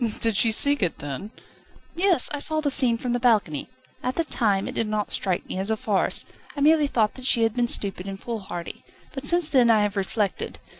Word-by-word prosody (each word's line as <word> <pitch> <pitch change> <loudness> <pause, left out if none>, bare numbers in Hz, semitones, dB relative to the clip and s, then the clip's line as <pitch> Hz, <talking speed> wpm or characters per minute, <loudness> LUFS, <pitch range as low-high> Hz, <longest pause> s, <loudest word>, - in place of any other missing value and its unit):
"Did 225 -2 +2
she 225 +3 +3
seek 285 +4 +3
it, 180 -4 0
then?" 145 +8 -6 0.6
"Yes; 355 -5 +3
I 290 - -2
saw 310 +2 0
the 295 -2 0
scene 255 -4 +3
from 245 0 -3
the 245 - 0
balcony. 210 - +1 0.3
At 255 - -3
the 335 - +1
time 210 -10 0
it - - -5
did 225 - -1
not 210 -1 -2
strike 185 -3 -1
me 185 - -5
as 195 +2 -2
a 220 - 0
farce. 205 -3 0 0.3
I - - -3
merely 305 0 +4
thought 220 -6 +1
that 260 - -10
she 230 - +3
had 225 -1 +1
been 240 0 0
stupid 195 -4 -1
and 195 0 -6
foolhardy. 195 -7 -6 0.3
But 275 0 -1
since 345 0 +2
then 255 -6 +3
I 220 -2 +4
have 205 0 -2
reflected. 200 +1 -2
225 Hz, 220 wpm, -24 LUFS, 200-270 Hz, 0.6 s, merely